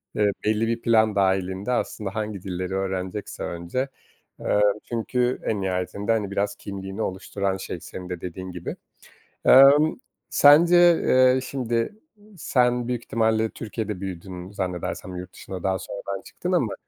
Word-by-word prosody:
eee, 105 -1 +3
belli 110 +1 +1
bir 115 0 -1
plan 110 -3 +3
dahilinde 95 +2 0
aslında 105 -5 -2
hangi 105 -3 -3
dilleri 95 -1 -4
öğrenecekse 95 +1 -3
önce. 85 +11 -3 0.5
Eee, 105 - +1 0.2
çünkü 125 +2 -1
en 105 -3 -1
nihayetinde, 95 +3 -2
hani 105 -3 0
biraz 100 +1 -1
kimliğini 95 +1 -6
oluşturan 95 0 -2
şey 90 -2 -6
senin 90 +2 -9
de 90 -2 -5
dediğin 95 +1 -6
gibi. 90 -1 -6 0.7
Emm, 140 +4 +7 0.3
sence, 160 +5 +6 0.3
eee, 130 0 +5
şimdi, 125 - -2 0.4
sen 125 -5 +1
büyük 120 -1 -2
ihtimalle 110 -1 +1
Türkiye'de 105 -3 -5
büyüdün, 90 -1 -7
zannedersem, 90 -1 -4
yurt 90 +1 -8
dışına 95 -2 -8
daha 95 -1 0
sonradan 100 0 -6
çıktın - - -5
ama, - - +1
100 Hz, 140 wpm, -24 LUFS, 95-115 Hz, 0.7 s, Emm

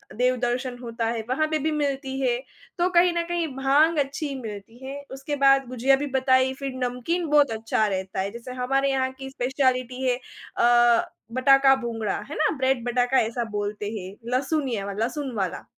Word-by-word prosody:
देव 250 +2 +2
दर्शन 245 +1 -2
होता 230 -1 -4
है 230 -1 -2
वहाँ 310 +5 +1
पे 310 - +2
भी 310 +2 0
मिलती 275 -2 -2
है 250 -3 +1 0.4
तो 350 +1 +2
कहीं 350 0 +5
न 340 - 0
कहीं 345 -1 -1
भांग 290 +5 +3
अच्छी 280 +1 -2
मिलती 220 0 -8
है। 275 +1 -5 0.2
उसके 270 +2 -4
बाद 275 -1 +6
गुझिया 255 +2 +3
भी 290 +2 -3
बताई, 260 0 +3
फिर 275 -1 -5
नमकीन 250 +9 -1
बहुत 290 -3 +4
अच्छा 220 0 0
रहता 190 -1 -3
है, 195 +1 -1
जैसे 235 +2 -8
हमारे 270 +2 +1
यहाँ 260 -1 0
की 265 0 -6
स्पेशिएलिटी 255 -1 0
है 250 - +3 0.4
अ, 240 -1 +4 0.2
बटाका 270 +1 +5
भुंगड़ा 225 -3 -2
है 300 - -5
ना? 310 - +2
ब्रेड 260 -2 +1
बटाका 245 +2 +2
ऐसा 230 +2 -1
बोलते 205 0 -3
हैं, 195 -3 -7 0.2
लहसुनिया 260 -7 -1
लहसुन 255 +6 -2
वाला। 190 -4 -3
260 Hz, 180 wpm, -25 LUFS, 235-275 Hz, 0.4 s, बाद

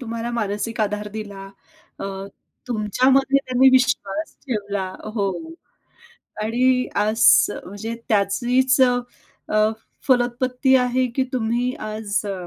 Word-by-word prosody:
तुम्हाला 230 -1 -4
मानसिक 225 0 -2
आधार 210 0 -1
दिला. 200 -3 -7 0.5
अ, - - -5 0.6
तुमच्यामध्ये 255 +5 +2
त्यांनी 255 +1 +5
विश्वास 260 +2 +1
ठेवला. 205 -5 -2 0.3
हो 200 -3 0 1.1
आणि 250 +3 +1
आज 215 +2 0 0.4
म्हणजे 205 +5 -6
त्याचीच 245 +6 +2
अ, 250 -1 +4 0.6
अ, 215 0 +4 0.4
फलोत्पत्ती 250 +1 +2
आहे 255 0 +1
की 265 - +1
तुम्ही 245 +1 0 0.2
आज 215 -1 -2
अ, 190 -3 -5
235 Hz, 105 wpm, -22 LUFS, 210-255 Hz, 1.1 s, त्यांनी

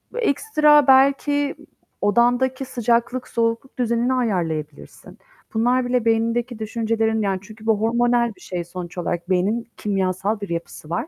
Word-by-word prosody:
ekstra 300 - +3
belki 280 +2 +3 0.5
odandaki 245 +5 +2
sıcaklık, 240 +1 0
soğukluk 230 +3 -2
düzenini 240 +1 +1
ayarlayabilirsin. 165 - -3 0.4
Bunlar 245 +3 +2
bile 245 -2 0
beynindeki 230 +1 0
düşüncelerin 220 0 -1
Yani, 195 -2 -1 0.2
bu 220 -1 +1
hormonal 235 -1 +1
bir 185 - -22
şey 180 -2 -4
sonuç 175 +1 -8
olarak 175 0 -3
beynin 205 +6 0
kimyasal 195 +1 -1
bir 200 - -5
yapısı 170 -2 -6
var. 175 - -2
230 Hz, 125 wpm, -22 LUFS, 195-250 Hz, 0.5 s, ekstra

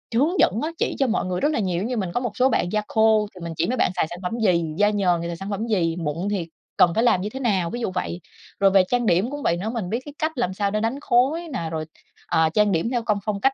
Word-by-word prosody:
hướng 305 +10 +2
dẫn 205 - +3
á, 310 - -1
chỉ - - -1
cho 270 - +3
mọi 230 - 0
người 180 -1 -2
rất 290 - +3
là - - 0
nhiều, 185 -5 -1
giống - - -2
như 250 -1 -2
mình 190 -5 -2
có - - +1
một 245 -3 -3
số 255 +1 +4
bạn 180 - 0
da 215 - +1
khô 220 -1 +3
thì 180 - -11
mình 170 -1 -5
chỉ 165 - +1
mấy 255 - -1
bạn - - +2
xài 165 - +1
sản 175 +1 -7
phẩm 180 - -2
gì, 180 -6 +2
da 205 +1 +4
nhờn 185 -5 +1
thì 170 - -3
xài 170 - -4
sản 195 +3 -6
phẩm 210 +3 -3
gì, 170 -7 +1
mụn 165 +3 -2
thì 185 -5 -2 0.3
cần 175 - +5
phải 225 - +2
làm 185 -6 +3
như 205 - -3
thế 265 - -7
nào, 195 -9 +1
ví 240 - -5
dụ 225 - -1
vậy. 175 -1 -3 0.4
Rồi 195 -1 +5
về 190 -1 +6
trang 245 -1 +1
điểm 195 +5 +2
cũng 290 0 -5
vậy 170 - +1
nữa, 200 +5 -3
mình 225 -6 -3
biết 230 - -1
cái 290 - -9
cách 315 +1 0
làm 190 -7 -1
sao 200 0 -1
để 215 - 0
đánh 230 +5 -1
khối 290 +8 +2
nè, 165 -9 -3
rồi, 155 -1 -3 0.4
ờ, 160 0 +3
trang 210 +1 +3
điểm 170 +5 0
theo 240 -2 0
công 210 -2 +1
phong 205 -2 -2
cách 270 +4 +3
205 Hz, 315 wpm, -23 LUFS, 180-240 Hz, 0.4 s, về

